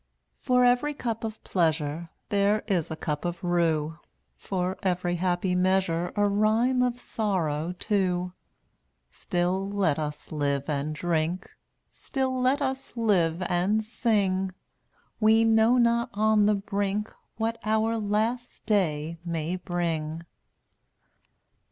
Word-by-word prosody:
0Utt<J - - -49
For 250 -1 +3
every 245 +5 +3
cup 230 -4 -3
of 220 -1 -5
pleasure 160 -2 0
d^tttAI* - - -44
There 205 +1 +2
is 180 -7 0
a 160 - -4
cup 150 -2 -3
of 175 0 -4
rue, 165 -2 +1 0.4
For 185 -1 -2
every 180 -1 0
happy 180 +1 0
measure 180 -2 +1
(j*^ 205 - +2
A - - +4
rhyme 220 +5 +2
of 245 -1 0
sorrow, 180 -9 -1
too. 180 -2 -1 0.8
Still, 180 - -1
let 190 -7 +1
us 150 -1 -5
live 140 -2 -1
and 150 0 -2
drink, 170 +2 -1 0.4
Still, 265 -2 -2
let 270 +3 +2
us 265 -1 -4
live 185 -6 +2
and 185 +5 +1
sing; 200 -5 0 0.7
We 220 +1 +5
know 225 +2 +4
not 235 0 +3
on 215 0 +4
the 210 - +4
brink 205 +1 -2 0.2
What 225 +1 -1
our 220 +1 +1
last 220 +4 -2
day 165 -6 0
may 170 0 -2
bring. 165 -3 -3
190 Hz, 130 wpm, -27 LUFS, 170-220 Hz, 0.8 s, We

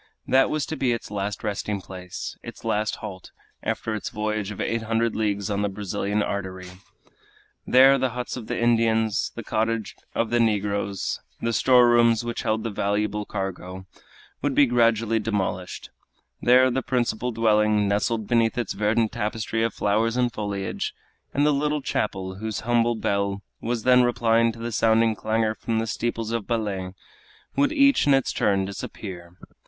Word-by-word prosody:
That 130 0 +4
was 155 -1 -1
to 160 - -4
be 130 -5 +1
its 115 - -6
last 100 0 -3
resting 105 -1 -2
place, 90 -1 -7
its - - -10
last 105 +1 0
halt, 95 -3 -8 0.3
after 110 - -2
its 105 - -4
voyage 105 -1 -2
of 105 - -7
eight 115 0 -1
hundred 115 +1 0
leagues 105 -2 -1
on 100 0 0
the 105 - +1
great 95 - -7
Brazilian 105 +1 -1
artery. 95 -2 -4 1.0
There 135 +2 +6
the 130 0 +1
huts 125 +1 -5
of 120 -4 -7
the - - -2
Indians, 115 -2 +2
the - - -6
cottage 110 -1 -1 0.2
of 115 -1 0
the 120 - +3
negroes, 100 -3 0 0.2
the 115 0 -1
store 125 0 +5
rooms 120 -1 +4
which 120 -1 -3
held 110 0 -1
the 115 - -3
valuable 105 +1 -1
cargo, 95 -2 -5 0.6
would 145 -2 0
be 145 - +6
gradually 115 -2 +2
demolished; 95 -4 -3 0.5
there 130 +1 +5
the 130 +2 0
principal 125 -2 -1
dwelling, 105 -2 +3
nestled 105 +2 0
beneath 115 0 +2
its 120 -5 -1
verdant 105 +2 +1
tapestry 110 0 -2
of 115 0 +1
flowers 110 +3 0
and 125 -2 +1
foliage, 100 -2 -3 0.4
and 145 +1 +2
the 150 - +4
little 150 0 0
chapel 95 -5 -2
whose 110 +1 -4
humble 120 0 +2
bell 100 -2 -1 0.2
was 115 -1 -2
then 125 0 +6
replying 115 -1 +3
to 115 - -13
the 115 +1 -4
sounding 110 0 +3
clangor 110 0 0
from 115 +1 -3
the 110 - 0
steeples 115 0 -2
of 115 -3 -2
Belem, 100 -5 -2 0.6
would 285 +1 +3
each 280 - +4
in 140 - +6
its 135 - 0
turn 95 -2 +1
disappear. 90 -2 -8
110 Hz, 170 wpm, -24 LUFS, 100-120 Hz, 1.0 s, There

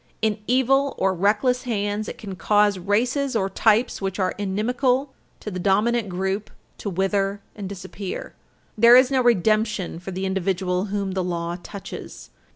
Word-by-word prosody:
In 215 -1 +1
evil 270 +2 +2
or 190 0 +2
reckless 210 +7 +2
hands, 205 -2 -2
it - - -7
can 195 -3 -7
cause 205 0 +2
races 245 +8 0
or 195 -3 0
types 220 +4 +2
which 195 -1 -2
are 185 -2 0
inimical 250 +7 0 0.3
to 210 - -5
the 185 - -4
dominant 210 +4 +2
group 190 +3 -2 0.3
to 205 - -3
wither 195 +2 0 0.2
and 200 -3 -6
disappear. 190 0 -6 0.4
There 235 +2 +7
is 255 +1 +6
no 265 -1 +3
redemption 215 -5 +1
for 185 - -8
the 190 +1 -3
individual 190 0 -1
whom 200 -1 -2
the 190 0 -1
law 170 -1 -3
touches. 200 +1 -9
205 Hz, 160 wpm, -23 LUFS, 190-235 Hz, 0.4 s, There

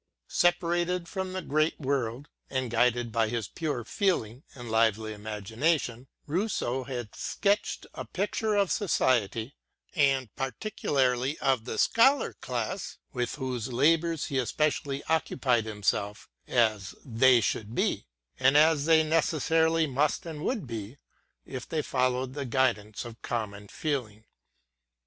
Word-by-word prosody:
Separated 175 0 +1
from 190 0 -4
the 185 -1 -3
great 155 +2 +1
world, 135 -2 -2 0.2
and 130 -3 -2
guided 120 0 +2
by 110 0 +1
his 115 -2 -2
pure 145 -7 -3
feeling 130 - -1
and 120 -3 -8
lively 110 -1 +2
imagination, 115 - -2 0.2
Rousseau 150 - -1
had 120 -5 -6
sketched 205 +1 0
a 130 - -6
picture 210 - -1
of 200 -2 +2
society, 125 - +1 0.4
and 135 - +2
particularly 135 - 0
of 130 -4 +1
the - - -4
Scholar 265 +4 +4
class, 125 - -4
— - - -42
with 120 -3 -2
whose 130 -3 -3
labours 160 +5 +2
he 135 - -1
especially 140 +1 -1
occupied 130 -7 +1
himself, 105 0 -2 0.2
— - - -45
as 110 -5 +1
they 125 0 +5
should 110 +1 -2
be, - - 0 0.3
and 135 +2 +5
as 155 -1 +5
they 160 -1 +5
necessarily 160 +1 +2
must 145 +5 0
and 160 -2 -6
would 225 - -1
be, 115 +1 -6 0.5
if 130 -2 -7
they 155 -2 -1
followed 130 -1 0
the 145 0 -3
guidance 115 -5 0
of 115 -1 -10
common 105 -3 -4
feeling. 110 -6 -3
130 Hz, 135 wpm, -28 LUFS, 115-160 Hz, 0.5 s, they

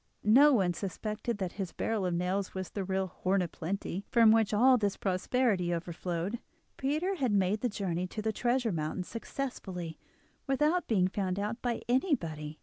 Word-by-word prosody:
No 270 +8 +7
one 190 -9 +3
suspected 215 +5 -3
that 190 -3 -3
his 185 - -4
barrel 210 -4 -1
of 175 - -1
nails 185 +3 -1
was 185 -1 -4
the 200 - -3
real 190 0 0
"Horn 185 +1 0
of 170 - -5
Plenty," 195 +2 -4
from 230 -3 +6
which 220 -2 +3
all 250 +5 +6
this 205 -4 0
prosperity 190 -1 +1
overflowed. 175 +4 -3 0.4
Peter 305 +8 0
had 260 -7 +1
made 200 +1 +2
the 245 - +1
journey 185 -4 -2
to 215 - -5
the 220 0 0
treasure 240 0 +1
mountain 160 +2 -2
successfully, 190 - -5 0.5
without 300 +6 +2
being 190 -5 +3
found 190 -1 -2
out 210 +4 -3
by 240 -2 -2
anybody. 165 - 0
200 Hz, 170 wpm, -31 LUFS, 180-240 Hz, 0.5 s, No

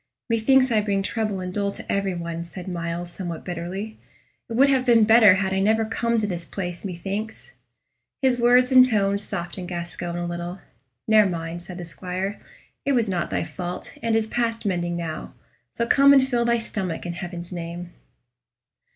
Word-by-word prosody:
"Methinks 255 +3 +4
I 215 -2 +3
bring 200 -2 0
trouble 210 -2 -2
and 180 0 -5
dole 200 0 0
to - - -7
every 195 -2 0
one," 170 -1 -4
said 175 +1 -9
Myles, 170 0 -4
somewhat 175 -3 -6
bitterly. 185 +5 -5 0.5
"It - - -4
would 265 +5 +5
have 265 -2 +3
been 235 -3 +5
better 220 -3 +7
had 190 0 0
I 190 - +1
never 220 +3 +2
come 230 +1 0
to 215 - 0
this 175 -4 -3
place, 175 -1 -5
methinks." 195 +4 -5 0.7
His 260 -3 +2
words 250 +2 +5
and 255 -1 +9
tone 200 -5 +2
softened 175 -2 -5
Gascoyne 175 0 -4
a 175 - -2
little. 175 +1 -4 0.5
"Ne'er 215 -2 +6
mind," 170 -1 -4
said 175 0 -8
the 175 - -6
squire; 185 +3 -4 0.4
"it 280 - +1
was 235 -4 +2
not 180 -3 -1
thy - - -1
fault, 180 -1 -6
and 230 -1 +1
is 225 -1 +2
past 230 0 -2
mending 175 -3 -1
now. 165 -2 -5 0.4
So 235 - 0
come 280 +3 +6
and 265 -1 +5
fill 240 -2 +1
thy 235 0 +3
stomach, 195 -8 -3
in 175 - -3
Heaven's 175 0 -7
name." 175 0 -6
195 Hz, 185 wpm, -24 LUFS, 175-225 Hz, 0.7 s, and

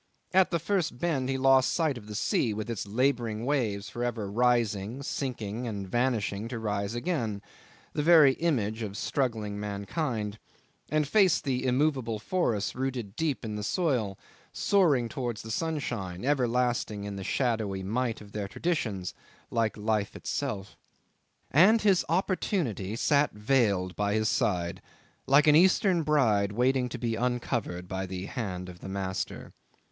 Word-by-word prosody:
At 190 0 +5
the 170 - +1
first 170 -5 -1
bend 135 -4 -1
he 135 - 0
lost 135 0 +4
sight 160 -5 +1
of 110 -4 -10
the 105 - -7
sea 105 +1 +1
with 110 +2 -4
its 105 -2 -4
labouring 120 -1 0
waves 110 -8 0
for 120 +3 -5
ever 110 -5 -2
rising, 120 0 +1
sinking, 120 -4 -3
and 100 -3 -4
vanishing 115 -2 0
to 120 0 -5
rise 105 -1 -2
again 120 - -1 0.5
the - - 0
very 155 -4 +7
image 115 -9 -1
of 105 -2 -4
struggling 110 -7 -1
mankind 105 +1 -3 0.5
and 155 -1 +1
faced 190 0 +4
the 130 -3 -1
immovable 130 -3 +1
forests 110 - -1
rooted 125 -6 -3
deep 150 -5 -1
in 105 -1 -4
the - - -4
soil, 120 - 0 0.3
soaring 155 -12 +3
towards 120 -3 -4
the 110 - -6
sunshine, 115 - -3
everlasting 125 -6 +1
in 100 -1 -5
the 95 - -5
shadowy 110 -6 -1
might 115 +4 -1
of 100 -1 -13
their 105 -2 -3
tradition, 110 - -2 0.5
like 115 -2 0
life 105 -1 -1
itself. 105 -9 -4 0.8
And 195 - +6
his 195 -4 +4
opportunity 165 - 0
sat 145 +4 +2
veiled 105 -5 +1
by 105 0 0
his 110 0 +2
side 85 -3 0 0.5
like 140 +2 +6
an 150 -1 +6
Eastern 185 +1 +4
bride 115 -10 +2
waiting 125 +2 +2
to 120 - -5
be 115 -1 -1
uncovered 120 -7 -2
by 95 +1 -3
the 90 0 -5
hand 95 -6 -4
of 90 -1 -10
the 95 - -8
master. 95 -1 -4
120 Hz, 150 wpm, -28 LUFS, 105-140 Hz, 0.8 s, very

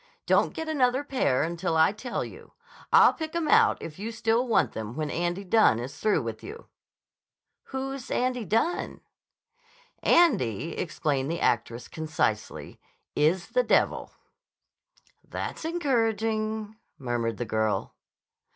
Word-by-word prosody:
Don't - - +2
get 320 - -4
another 265 -3 +1
pair 255 - +1
until 170 0 -1
I 160 +3 +5
tell 235 +4 -4
you. - - -13 0.4
I'll - - +7
pick 315 0 -6
'em 335 -2 0
out 450 +3 +5
if 160 +1 -8
you 220 +3 -4
still 230 +2 +1
want 230 - +2
them 110 +1 -6
when 155 -1 -3
Andy 175 +3 -2
Dunne 200 - +4
is 125 +5 -6
through 210 - +2
with 115 -1 -5
you." 445 +5 -9 1.0
"Who's 270 -1 -5
Andy 250 -1 0
Dunne?" 225 - -1 1.0
"Andy," 165 - +3
explained 145 -5 -1
the 170 +1 -2
actress 115 +1 0
concisely, 155 -9 -3 0.4
"is 170 +5 +1
the - - +2
devil." - - +1 1.1
"That's - - -6
encouraging," 220 - -1 0.2
murmured 120 -4 -2
the 120 - -3
girl. 110 -1 -1
210 Hz, 130 wpm, -27 LUFS, -, 1.1 s, I'll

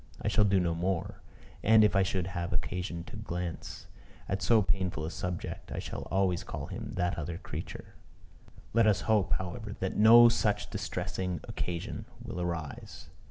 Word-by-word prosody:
I 105 - -1
shall 105 +1 +4
do 100 -1 +3
so 90 - +3
no 85 -1 +1
more; 85 +1 -2 0.4
and, 110 0 +6
if 105 - +4
I 100 - +5
should 95 -1 0
have 90 -1 -3
occasion 90 -1 -2
to - - -10
glance 85 -1 -5 0.4
at 95 0 -1
so 110 -3 +4
painful 95 -4 -1
a 80 - -4
subject, 90 0 -5
I - - -4
shall - - -5
always 95 -2 +1
call - - -5
him - - -6
"that 90 0 0
other 85 +2 -4
creature." - - -7 0.8
Let 115 0 +5
us 105 -2 +3
hope, 105 -4 +2
however, 100 +3 -4
that 95 - -2
no 115 +3 +9
such 115 -3 +1
distressing 90 -2 -3
occasion 85 -1 -4
will 90 - -5
arise. 85 -5 -5
95 Hz, 170 wpm, -30 LUFS, 85-105 Hz, 0.8 s, no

